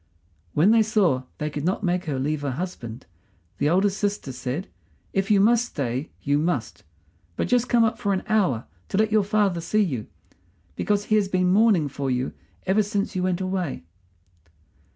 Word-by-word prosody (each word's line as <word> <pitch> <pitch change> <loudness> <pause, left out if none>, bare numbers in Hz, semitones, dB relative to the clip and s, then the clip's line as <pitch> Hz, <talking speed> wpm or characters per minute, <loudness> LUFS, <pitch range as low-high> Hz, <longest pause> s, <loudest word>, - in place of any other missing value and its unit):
When 170 +8 +5
they 225 0 +6
saw 195 - +2
they 150 0 -3
could 145 0 -4
not 185 +5 -1
make 180 0 0
her 145 -4 -2
leave 145 +3 -1
her 145 - -2
husband, 130 -6 -5 0.5
the 145 - +2
eldest 190 +4 +2
sister 205 -9 -2
said: 130 +7 -4 0.5
"If 195 +2 0
you 205 -2 +5
must 235 +4 +4
stay, 135 - -3
you 145 0 +2
must. 155 -8 -2 0.5
But - - -1
just 245 0 +2
come 235 -1 +4
up 225 - 0
for 200 - 0
an 190 - 0
hour, 195 - +1 0.2
to - - -1
let 215 0 +2
your 215 0 +4
father 200 -4 +1
see 210 +6 +2
you, 130 - -3 0.7
because 205 -1 0
he 215 - +2
has 205 -2 +2
been 185 -1 +2
mourning 200 -7 +4
for 140 0 -3
you 125 0 -1 0.3
ever 195 +3 +3
since 205 -1 -2
you 185 - 0
went 185 0 0
away." 185 - -2
185 Hz, 185 wpm, -24 LUFS, 145-205 Hz, 0.7 s, they